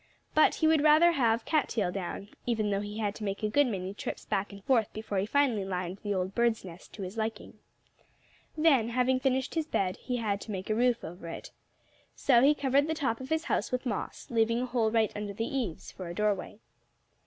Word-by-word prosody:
But 310 - +5
he - - 0
would 315 -2 +4
rather 310 +3 +6
have 230 -7 +1
cat 310 -4 +1
tail 200 -6 0
down, 195 +1 -5 0.2
even 215 -3 0
though 200 0 0
he 205 +1 -6
had 210 -2 -1
to 215 - -8
make 200 +1 -3
a 215 - +1
good 285 +5 +4
many 190 -4 -3
trips - - -6
back 200 0 -1
and 200 -1 -11
forth 230 -4 +2
before 215 -2 -3
he 195 - -1
finally 250 -5 +2
lined 185 0 -4
the 205 -1 -2
old 185 +1 -2
bird's 235 -3 +1
nest 175 -1 -11
to 200 - -6
his 190 +4 -7
liking. 220 -1 -4 1.0
Then, 280 -8 +4
having 255 +2 +2
finished 265 -1 0
his 320 -2 -1
bed, 185 -10 0
he 250 -1 -3
had 205 -3 -1
to 220 - -7
make 190 +1 -4
a - - +2
roof 240 +1 +2
over 170 0 -8
it. 165 - -7 0.6
So 245 -4 +4
he 285 +3 +5
covered 280 +1 +2
the 320 - -1
top 260 -5 -1
of 260 - -7
his 320 0 0
house 215 - -1
with 255 +1 -2
moss, 215 -6 -4
leaving 230 +1 +2
a - - 0
hole 240 -3 +1
right 220 -1 +2
under 205 -1 -4
the 225 +3 -2
eaves, 235 -11 -3
for 185 - -8
a 170 - -6
doorway. 205 -1 -1
225 Hz, 225 wpm, -29 LUFS, 200-260 Hz, 1.0 s, rather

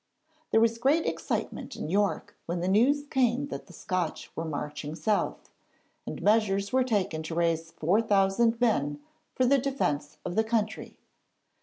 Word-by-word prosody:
There 225 - +4
was 230 0 +2
great 290 +7 +3
excitement - - -3
in - - -5
York 200 +4 0
when 170 +1 -2
the 175 - -1
news 250 +9 +3
came 265 +1 +1
that - - -6
the - - -14
Scotch 180 -2 -3
were 165 - -3
marching 150 0 -4
south, 205 +6 -1 0.6
and - - -5
measures 205 -1 +2
were 260 0 +4
taken 200 -10 0
to 160 +1 -5
raise 165 -1 +1
4,000 200 +6 +2
men 145 - +1 0.4
for 255 - +2
the 275 +2 +4
defence 150 - -1
of 180 - -3
the 220 - +3
country. 220 -1 -2
200 Hz, 155 wpm, -28 LUFS, 165-235 Hz, 0.6 s, There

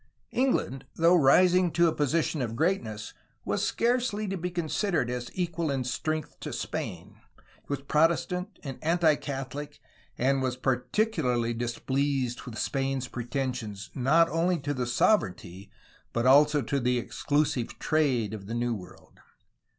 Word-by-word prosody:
England, 190 - 0
though 170 +2 +5
rising 180 +4 +5
to 170 +1 +3
a 160 - +1
position 150 +1 0
of 115 -2 -3
greatness, 115 - -1 0.3
was - - -1
scarcely 235 -3 0
to 195 - -2
be 180 0 -3
considered 170 - -1
as 125 -1 -4
equal 170 -3 -1
in 135 -2 0
strength 155 +5 -3
to - - -6
Spain, - - -5 0.5
was 140 -1 -3
Protestant 170 +6 +1
and 135 -4 -6
anti 165 -1 +4
Catholic, 145 +1 -6 0.4
and 135 +2 +2
was 130 -1 -1
particularly 125 - 0
displeased 125 +2 -1
with 115 -2 -7
Spain's 135 -2 -1
pretensions 120 -5 -4
not 150 +6 +4
only 170 +3 +1
to 145 - -2
the 125 -3 -2
sovereignty 100 - 0 0.4
but 115 +1 0
also 145 +2 +5
to 140 - -1
the 125 0 +1
exclusive 145 +1 -1
trade 130 -9 +1
of 100 -3 -7
the 115 - -4
New 120 0 0
World. 90 -5 -11
140 Hz, 140 wpm, -28 LUFS, 125-165 Hz, 0.5 s, though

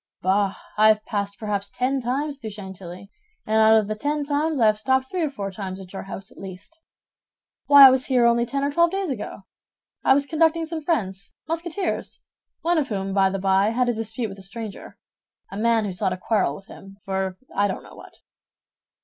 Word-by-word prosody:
"Bah, 195 +1 +2 0.2
I 215 - +7
have 215 0 +3
passed 200 -1 -3
perhaps 205 -2 -3
ten 260 +4 -1
times 275 +4 -2
through 220 - -6
Chantilly, 190 -1 -10 0.3
and 220 0 +2
out 220 0 +7
of 215 -2 +1
the 215 - -1
ten 290 +7 -2
times 295 +1 0
I 230 - +4
have 215 0 +3
stopped 260 +3 +1
three 365 - -1
or 310 - +1
four 200 -8 -5
times 190 -1 -6
at 185 -1 -11
your 195 - -5
house 195 0 -8
at - - -16
least. 195 - -10 0.9
Why 285 -1 +10
I 265 - +10
was 260 0 0
here 250 -3 +3
only 235 0 +3
ten 275 +3 -2
or 285 - 0
twelve 340 +3 +4
days 385 -3 -2
ago. 210 -4 -6 0.6
I 265 - +5
was 280 0 +1
conducting 325 +2 +2
some 320 0 -5
friends, 195 - -2
Musketeers, 335 +3 -3 0.4
one 340 0 +2
of 285 - -2
whom, 195 -2 -3
by 195 -1 +4
the 195 - -2
by, 195 +1 +2
had 245 +2 +1
a - - +2
dispute 225 +1 -3
with 195 0 -10
a - - -10
stranger—a 205 -1 -11
man 225 0 +2
who 195 - -3
sought 185 0 -1
a - - -5
quarrel 185 -6 0
with 195 - -12
him, 195 0 -13
for 190 -1 -2 0.2
I 200 +1 +3
don't 190 - -5
know - - -14
what." - - -15
220 Hz, 210 wpm, -23 LUFS, 195-280 Hz, 0.9 s, Why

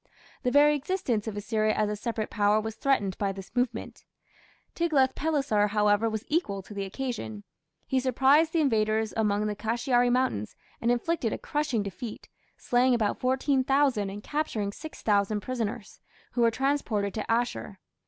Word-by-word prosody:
The 250 - +1
very 295 +3 +5
existence 270 - -1
of 210 -2 -4
Assyria 215 0 0
as 215 - +1
a 210 - -2
separate 220 0 -3
power 210 0 +3
was 220 0 -4
threatened 215 -7 0
by 200 -1 0
this 195 +4 -10
movement. 245 0 -2 0.7
Tiglath 295 -6 +2
pileser, 280 -9 +1
however, 210 +1 +2
was 220 +1 -4
equal 205 - -1
to 210 - -11
the 200 -1 -3
occasion. 190 - -5 0.4
He 265 - +1
surprised 270 +5 +4
the 330 - +2
invaders 220 -4 +1
among 210 -1 +1
the 210 -1 -2
Kashiari 240 +3 +1
mountains 250 - 0 0.3
and 235 - +1
inflicted 245 0 0
a - - -2
crushing 290 -8 -1
defeat, 200 +3 -7 0.3
slaying 250 0 +2
about 215 -3 0
14,000 265 -3 +2
and 205 +2 -8
capturing 235 -10 -2
6000 210 -6 -1
prisoners, 230 -2 -4 0.3
who 245 - -1
were 230 - +5
transported 230 -5 -1
to 215 - -3
Asshur. 230 -3 -1
230 Hz, 155 wpm, -28 LUFS, 210-265 Hz, 0.7 s, very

